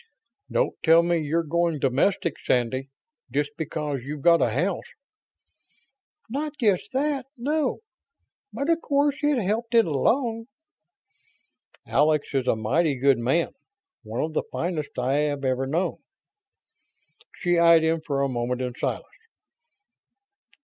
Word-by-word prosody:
Don't - - +1
tell 165 +1 +6
me 170 0 +1
you're 160 +3 0
going 170 0 0
domestic, 140 +5 +1
Sandy, 130 +2 0 0.4
just 145 +2 -1
because 150 -2 -3
you've 145 +3 -7
got 170 -1 +5
a - - +3
house?" 170 - -1 1.4
"Not 285 +5 -3
just 205 -4 +1
that, 275 -1 -1
no. 290 - -1 0.7
But 280 +5 -1
of 330 0 +1
course 285 -1 +1
it 295 -2 +2
helped 230 +4 -1
it 230 - +6
along." 225 - 0 1.4
"Alex 150 0 +1
is 130 -2 0
a - - +3
mighty 140 +7 +1
good 135 -1 +3
man. 135 +8 0 0.5
One 115 +2 -3
of 155 0 -3
the - - +1
finest 165 -4 -3
I 130 +3 +1
have 145 -2 -1
ever 130 0 0
known." 170 +5 -1 1.4
She 175 -2 +1
eyed 170 -1 +6
him 160 0 +1
for 140 -4 -1
a - - +2
moment 125 -1 -2
in 125 -1 -3
silence. - - -3
160 Hz, 135 wpm, -25 LUFS, 135-215 Hz, 1.4 s, tell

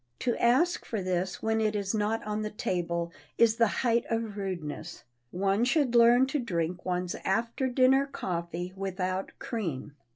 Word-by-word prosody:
To 240 -2 +1
ask 260 +10 +3
for 220 - -3
this 185 0 -2
when 220 0 +1
it 215 -1 +1
is 200 0 -1
not 215 +1 0
on 210 0 -2
the 215 - -2
table 170 -4 -2 0.3
is 230 -1 +4
the 230 -1 +5 0.2
height 235 0 +3
of 225 -2 -2
rudeness. 175 -4 -5 0.3
One 195 - +1
should 255 0 +2
learn 240 +2 +6
to 290 +3 -1
drink 175 -7 -2
one's 180 -1 -1
after 230 +6 0
dinner 260 +2 +4
coffee 175 - -4
without 190 -1 -3
cream. 165 - -4
210 Hz, 160 wpm, -29 LUFS, 180-235 Hz, 0.3 s, learn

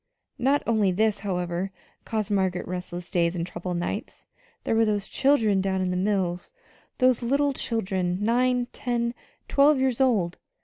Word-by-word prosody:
Not 275 +4 +2
only 215 -4 +2
this, 210 +2 +1
however, 180 -1 -2 0.3
caused 215 -2 -2
Margaret 190 -3 0
restless 180 0 -6
days 170 0 +1
and 170 -1 -2
troubled 175 0 -4
nights: 175 +5 -5 0.4
there - - 0
were 225 0 +4
those 210 -2 0
children 225 -8 +2
down 190 0 0
in 185 -1 0
the - - -1
mills 185 - -1 0.4
those 255 -2 +3
little 280 +4 +1
children, 190 -8 -1
nine, 245 +3 +2
ten, 235 -1 -1 0.3
twelve 285 0 +4
years 260 -1 +1
old. 205 -10 +2
205 Hz, 150 wpm, -26 LUFS, 180-240 Hz, 0.4 s, were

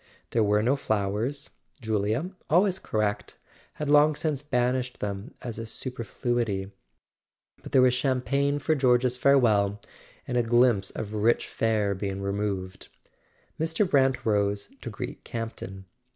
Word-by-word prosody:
There 115 - +2
were 105 0 +2
no 130 +5 +3
flowers: 110 +3 -1 0.3
Julia, 110 - -1 0.2
always 185 +3 +3
correct, 105 -1 -2 0.4
had 150 - -4
long 150 +1 +5
since 150 -2 -2
banished 125 -2 -1
them 100 +6 -5
as 115 -3 -5
a - - -3
super¬ 115 +2 -5
fluity. 115 -5 -2 0.9
But - - -10
there 130 - +5
was 125 -1 +5
champagne 140 +2 +1
for 155 +2 +1
George's 125 -3 +3
farewell, 105 -8 +3 0.5
and 125 - -1
a - - +4
glimpse 120 -4 +3
of 105 0 -6
rich 110 +2 +2
fare 110 -3 0
being 95 0 -4
removed. 100 -1 -3 0.7
Mr. 165 +5 +1
Brant 135 -5 +2
rose 100 -2 +1
to - - -5
greet - - -7
Campton. 95 -4 -6
120 Hz, 135 wpm, -27 LUFS, 105-135 Hz, 0.9 s, long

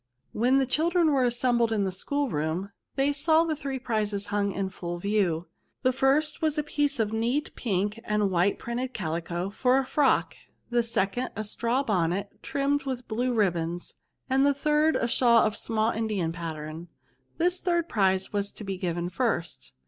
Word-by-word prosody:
When 250 +5 +3
the 270 - +3
children 325 +4 +2
were 265 -3 +3
assembled 240 -1 +2
in 215 -2 +1
the 190 - -1
school 285 +10 -1
room^ 160 +6 -2 0.2
they 280 +1 +2
saw 315 +3 +3
the 325 -2 -1
three 275 -2 -4
prizes 210 -5 -2
hmig 205 -1 +1
up 195 - -5
in 195 -1 -1
full 175 -1 -5
view. 180 -4 0 0.4
The 255 0 +3
first 285 +5 +2
was 310 -1 +1
a 300 - +1
piece 290 -2 0
of 220 -1 0
neat 240 +7 -1
pink 205 -1 -1
and 210 -3 +1
white 180 +3 +2
printed 245 +2 -4
calico, 170 +1 -3
for 250 +4 +2
a 270 - +1
frock; 280 +1 +2 0.4
the 240 0 +3
second, 230 +2 -1
a 215 - -3
straw 235 +5 0
bonnet, 195 -3 -1
trimmed 280 0 0
with 255 -2 -4
blue 245 +3 0
ribbons; 175 -6 -1 0.3
and 265 +1 +3
the 285 0 +3
third, 300 +2 +2
a 235 - +1
shawl 235 -1 +4
of 215 - 0
a - - -7
small 225 0 0
Indian 210 -7 -1
pattern. 160 -1 -6 0.5
This 360 +2 +1
third 345 -2 0
prize 190 - +1
was 205 0 0
to - - -9
be 195 -2 -4
given 175 -1 -2
first. 175 - -2
225 Hz, 185 wpm, -27 LUFS, 190-270 Hz, 0.5 s, shawl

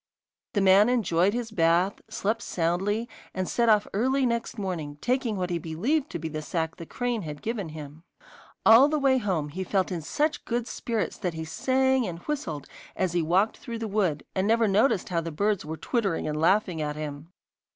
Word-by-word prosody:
The 200 - +3
man 195 +3 +6
enjoyed 200 -4 +2
his 240 -2 -3
bath, 175 +1 +2
slept 220 +3 -1
soundly, 195 +7 -1 0.3
and 185 -1 -1
set 235 -1 +2
off 210 -1 +5
early 260 +6 +2
next 235 -1 -2
morning, 170 -8 -4
taking 245 - 0
what 180 -1 -2
he 170 - 0
believed 230 - -1
to - - -4
be 160 0 -4
the 155 -1 -4
sack 160 +1 -3
the 165 - -9
crane 245 -3 -2
had 150 -4 -7
given 215 -6 -3
him. 155 0 -9 0.6
All 230 +5 +8
the 305 - +1
way 270 -2 +3
home 180 -9 -1
he 185 +6 -4
felt 190 0 0
in 175 -2 -2
such 295 - -1
good 240 -1 -2
spirits 230 -3 -3
that 175 -3 -2
he 160 0 -4
sang 260 +8 +1
and 170 -2 -5
whistled 170 - -4 0.3
as 185 -2 0
he 175 - +2
walked 185 +7 +2
through 230 -1 -6
the 225 0 -3
wood, 195 -8 0
and 190 +1 0
never 225 0 +3
noticed 200 +1 +2
how 170 -2 0
the 165 0 -5
birds 200 +3 0
were 160 +1 -5
twittering 200 -8 -1
and 150 0 -2
laughing 180 -1 +2
at 150 -1 -2
him. 150 +1 -6
190 Hz, 200 wpm, -27 LUFS, 165-230 Hz, 0.6 s, All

